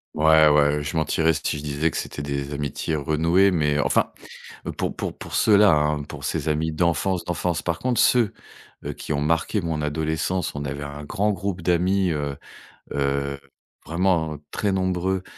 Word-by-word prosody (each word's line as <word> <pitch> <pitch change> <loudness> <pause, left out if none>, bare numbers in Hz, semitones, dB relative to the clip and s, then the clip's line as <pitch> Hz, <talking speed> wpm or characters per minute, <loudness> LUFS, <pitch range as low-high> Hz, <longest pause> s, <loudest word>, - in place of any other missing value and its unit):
Ouais, 80 0 +6
ouais, 75 0 +3
je 70 - -4
mentirais 80 +1 +2
si 75 - -2
je 70 - -7
disais 75 +2 0
que - - -5
c'était - - -5
des 70 0 -3
amitiés 70 +2 -2
renouées, 80 +6 +3
mais 75 -5 +1
enfin, 70 -2 +2 0.7
pour - - -2
pour - - -3
pour - - -8
ceux-là, 105 -1 +5
hein, 75 0 +1
pour 70 -1 -9
ces 80 0 -2
amis 80 +1 0
d'enfance, 85 +3 0
d'enfance. 90 -1 -1
Par 85 -1 -2
contre, 125 -2 0
ceux, 120 -5 +4 0.5
heu, - - -3
qui - - -5
ont 70 - 0
marqué 80 +7 +1
mon 80 -3 -2
adolescence, 80 +4 -1
on 75 0 -4
avait 70 0 -4
un 70 +1 -7
grand 100 +8 0
groupe 95 -1 -3
d'amis, 90 +3 +2
heu 70 -2 -3 0.6
heu, 70 0 -1 0.4
vraiment, 85 -2 0
heu, - - -11
très 105 - 0
nombreux 95 0 0
80 Hz, 175 wpm, -24 LUFS, 75-90 Hz, 0.7 s, Ouais